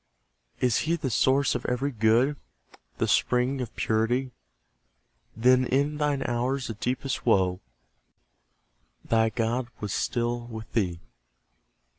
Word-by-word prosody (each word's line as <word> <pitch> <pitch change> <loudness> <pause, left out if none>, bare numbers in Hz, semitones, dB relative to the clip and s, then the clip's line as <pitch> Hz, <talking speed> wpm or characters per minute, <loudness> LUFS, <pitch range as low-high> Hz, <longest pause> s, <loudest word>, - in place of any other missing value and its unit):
Is 125 -3 +2
He 170 - +3
the 140 -6 -3
source 135 +3 +3
of 125 - -3
every 130 +3 -1
good, 115 +5 +3 0.6
The - - 0
spring 125 +2 +1
of 120 - -6
purity? 120 +4 0 1.1
Then 125 +2 +5
in 145 +3 +1
thine 145 -2 0
hours 125 +1 -1
of 110 - -10
deepest 130 +3 -2
woe, 95 -5 +2 1.5
Thy 115 0 +3
God 115 +2 -1
was 105 -2 -4
still 120 0 -1
with 110 -2 -9
thee. 90 -6 0
125 Hz, 120 wpm, -27 LUFS, 115-130 Hz, 1.5 s, Then